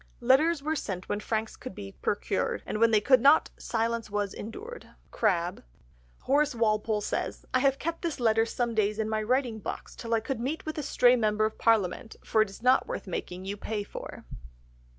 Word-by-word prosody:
"Letters 280 +5 +3
were 310 +1 0
sent 185 - -4
when 205 - -1
franks 220 +1 -2
could 255 -7 -9
be 100 -1 -7
procured, 65 - -2
And 215 - -3
when 230 0 +5
they 215 -2 +4
could 255 +2 +5
not, 285 +4 +5
silence 230 -1 -1
was 205 -1 -2
endured." 435 - -8 0.2
(CRABBE.) 180 -5 0 0.6
Horace 290 0 +2
Walpole 215 -1 +1
says, - - -3
"I 255 - +4
have 270 0 +3
kept 335 +3 -3
this 335 -5 -3
letter 225 -1 +3
some 240 0 -1
days 215 -1 +1
in 220 -1 -1
my 220 0 -1
writing 240 0 0
box - - -6
till 230 -1 -1
I - - +2
could 230 +2 -4
meet 275 +7 -3
with 310 0 -4
a - - -1
stray 250 -3 +4
member 215 -2 +2
of 220 - -4
parliament, 220 -1 +1
for 220 - +2
it 215 - +1
is 195 +4 -12
not 255 +1 +4
worth - - -5
making 185 0 -5
you 200 +1 -3
pay 210 0 -3
for." - - -9
225 Hz, 200 wpm, -28 LUFS, 210-260 Hz, 0.6 s, when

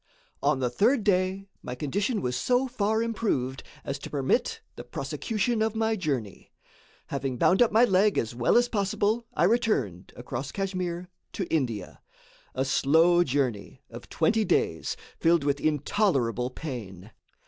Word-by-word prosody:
On 145 0 +2
the 125 -2 0
third 225 - +2
day, 190 0 +1
my 125 - -6
condition 200 - -1
was 125 0 -1
so 250 - +1
far 220 -2 0
improved 170 - -1 0.2
as 140 0 -3
to - - -8
permit 150 - 0
the - - -8
prosecution 225 +1 -2
of 220 0 0
my 220 0 +1
journey. 135 - -4 0.6
Having 135 -2 -3
bound 185 - +3
up 240 - +5
my 225 +3 +6
leg 200 -1 +3
as 115 +1 -1
well 120 - +3
as 245 0 +4
possible, 210 +2 0
I - - +2
returned, 175 - +1
across 130 +2 -5
Kachmyr, 185 -3 -3 0.3
to 190 - -2
India; 120 - -2 0.5
a 130 - 0
slow 160 +6 +4
journey, 130 -8 -2
of - - -10
twenty 220 0 +2
days, 80 - 0 0.2
filled 165 -2 +3
with 140 0 0
intolerable 140 - +1
pain. 110 - -7
170 Hz, 150 wpm, -27 LUFS, 130-215 Hz, 0.6 s, my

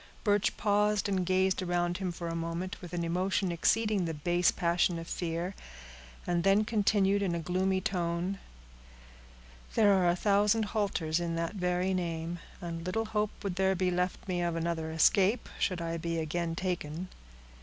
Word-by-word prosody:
Birch 205 -1 +2
paused 210 -1 +2
and 190 -2 0
gazed 190 0 +2
around 175 0 0
him 185 -2 -2
for 170 0 -6
a 165 - -3
moment, 165 +3 -3
with 175 -3 -9
an 175 -1 -2
emotion 185 +2 0
exceeding 210 +3 +2
the 165 -1 -3
base 175 +4 +2
passion 170 0 +1
of 165 0 -7
fear, 170 +2 -3 0.7
and 175 -1 0
then 195 +2 +4
continued 205 -2 +2
in 185 -4 0
a - - -2
gloomy 185 +3 0
tone, 180 0 -2 1.4
"There 205 -2 +5
are 185 -2 +3
a 175 - +3
thousand 205 +3 +3
halters 175 -7 0
in 170 -1 -2
that 165 +2 -2
very 180 -1 0
name, 170 -1 -3 0.2
and 170 -2 -5
little 185 +6 -1
hope 215 -1 0
would 195 -2 -3
there 190 0 +2
be 180 0 +1
left 180 +2 -2
me 180 -2 -1
of 170 -1 0
another 165 -1 -2
escape, 195 +7 +3
should 180 -3 0
I 165 0 -2
be 165 0 -2
again 165 +1 -2
taken. 180 -1 -3
180 Hz, 170 wpm, -30 LUFS, 170-195 Hz, 1.4 s, There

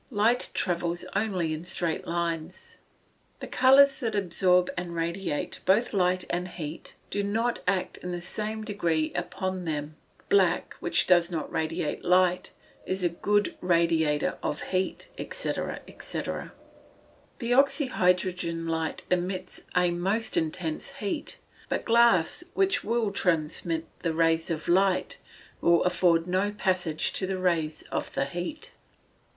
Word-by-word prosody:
Light 230 +1 +2
travels 175 -1 0
only 185 -7 0
in 155 +1 -5
straight 175 -2 -1
lines. 170 - -4 0.6
The - - -6
colours 275 +2 +5
that 225 -5 -2
absorb 180 -1 +2
and 175 -1 -4
radiate 170 -1 -2
both 215 +6 +3
light 185 -2 +2
and 180 +1 -1
heat 165 -3 -7 0.2
do 205 - 0
not 225 +4 0
act 190 -1 0
in 180 - -5
the 175 - -3
same 215 +5 -3
degree 170 -7 0
upon 185 -2 -3
them 150 -1 -3 0.2
both. - - -29
Black, 190 -3 +3
which 175 - +2
does 175 -2 +4
not 165 -4 -4
radiate 160 0 -2
light, 180 0 +3 0.3
is 185 0 -3
a 175 - +3
good 205 +4 0
radiator 165 -4 +2
of 150 - -2
heat, 185 0 -1
&c., - - -2 0.5
&c. - - -4 1.2
The 240 0 -1
oxy 275 +3 +4
hydrogen 180 -6 0
light 160 -1 -2
emits 180 +1 -2
a 180 -1 +3
most 195 +6 -1
intense 160 - -2
heat, 210 -8 -4 0.3
but - - -2
glass 235 - +4
which 390 0 +2
will 225 -2 0
transmit 165 -2 0
the 165 -2 -2
rays 165 0 +2
of 160 -2 -3
light, 190 +1 +2 0.4
will 170 0 +4
afford 170 -2 +3
no 185 +3 +1
passage 185 -6 0
to 190 - -1
the 190 0 -2
rays 170 -4 0
of - - -2
the 135 - +1
heat. 180 - -6
180 Hz, 140 wpm, -27 LUFS, 165-205 Hz, 1.2 s, colours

